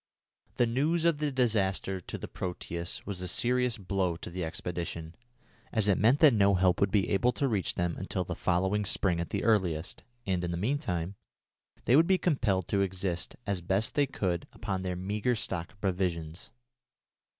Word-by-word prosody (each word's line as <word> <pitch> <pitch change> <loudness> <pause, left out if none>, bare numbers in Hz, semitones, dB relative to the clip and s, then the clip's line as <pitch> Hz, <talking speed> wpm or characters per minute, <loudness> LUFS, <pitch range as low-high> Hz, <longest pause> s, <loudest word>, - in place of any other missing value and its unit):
The 120 - +3
news 150 +8 +1
of 165 -3 +3
the 150 -1 0
disaster 100 -7 +1
to - - -6
the - - -7
Proteus 85 -1 -4
was 95 -2 -5
a 90 - -3
serious 125 +5 +1
blow 95 -3 -1
to 85 - -8
the 90 +1 -3
expedition, 85 0 -4 0.6
as 110 -3 +2
it 100 - +3
meant 120 +6 +5
that 150 -5 +8
no 100 -2 +4
help 90 -1 +2
would 100 - +4
be 100 -2 +1
able 120 +5 +3
to 140 - 0
reach 105 -7 0
them 85 -1 -1
until - - -2
the - - -4
following 95 +4 +1
spring 95 -3 +1
at 85 - -3
the - - -2
earliest, 90 -7 +1 0.2
and, 90 -2 0
in 90 - -1
the 85 - -2
meantime, 95 - -2 0.7
they 120 - +5
would 160 +3 +6
be 190 -1 +4
compelled 120 - +1
to 100 - +2
exist 95 -2 -1
as 100 -3 -1
best 95 +5 0
they 145 -1 +2
could 90 -9 -2
upon 95 -3 -3
their 90 -1 -2
meagre 105 +7 -1
stock 90 -5 -3
of 100 - -28
provisions. 90 -4 -2
95 Hz, 185 wpm, -30 LUFS, 90-115 Hz, 0.7 s, that